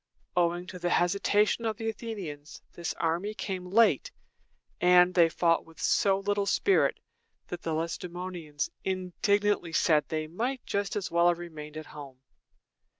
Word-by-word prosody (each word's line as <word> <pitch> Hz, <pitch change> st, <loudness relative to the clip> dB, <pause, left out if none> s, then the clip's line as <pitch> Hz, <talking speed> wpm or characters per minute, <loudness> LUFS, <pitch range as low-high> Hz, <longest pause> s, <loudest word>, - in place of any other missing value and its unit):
Owing 175 Hz, 0 st, +1 dB
to 180 Hz, 0 st, -9 dB
the 175 Hz, 0 st, -1 dB
hesitation 200 Hz, +6 st, +2 dB
of 220 Hz, -2 st, -1 dB
the 225 Hz, -1 st, -4 dB
Athenians, 195 Hz, -10 st, -6 dB
this 170 Hz, -1 st, -4 dB
army 175 Hz, +6 st, -1 dB
came 185 Hz, -3 st, -4 dB
late, 210 Hz, -, +4 dB, 0.7 s
and 180 Hz, 0 st, +5 dB
they 170 Hz, -2 st, +5 dB
fought 165 Hz, 0 st, +2 dB
with 165 Hz, -1 st, -18 dB
so 195 Hz, -1 st, +3 dB
little 200 Hz, 0 st, -1 dB
spirit 390 Hz, -, +2 dB, 0.5 s
that 175 Hz, -, -5 dB
the 165 Hz, -, -2 dB
Lacedæmonians 170 Hz, -1 st, -4 dB
indignantly 190 Hz, 0 st, 0 dB
said 155 Hz, -3 st, +3 dB
that -, -, -41 dB
they 155 Hz, -1 st, -2 dB
might 235 Hz, +11 st, -3 dB
just 200 Hz, 0 st, -2 dB
as 205 Hz, -2 st, -3 dB
well 170 Hz, +1 st, +4 dB
have 175 Hz, -1 st, +3 dB
remained 155 Hz, -3 st, -8 dB
at 155 Hz, -, -6 dB
home. 140 Hz, -3 st, -11 dB
180 Hz, 150 wpm, -29 LUFS, 165-200 Hz, 0.7 s, and